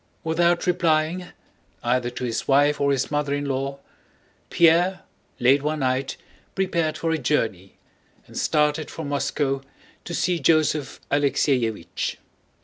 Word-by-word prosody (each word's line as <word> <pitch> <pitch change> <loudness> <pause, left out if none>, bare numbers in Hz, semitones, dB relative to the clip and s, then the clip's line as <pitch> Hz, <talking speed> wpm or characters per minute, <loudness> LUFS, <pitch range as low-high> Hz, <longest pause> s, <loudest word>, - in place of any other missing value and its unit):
Without 170 +2 +2
replying 175 0 +1 0.6
either 120 0 +1
to 125 - -7
his 120 -2 -2
wife 145 +2 +3
or 140 0 +3
his 135 0 -1
mother 145 -1 0
in 145 0 -3
law, 135 0 -2 0.7
Pierre 170 +3 +4 0.4
late 135 +3 +4
one 150 +1 -2
night 130 +1 -1 0.4
prepared 170 -5 0
for 165 - -1
a 160 - 0
journey 110 -9 -1 0.5
and - - -16
started 150 +1 +1
for 160 - -6
Moscow 140 -1 -1 0.4
to 175 - -6
see 175 +1 +1
Joseph 155 -1 +1
Alexéevich. 125 - 0
145 Hz, 130 wpm, -24 LUFS, 135-160 Hz, 0.7 s, Pierre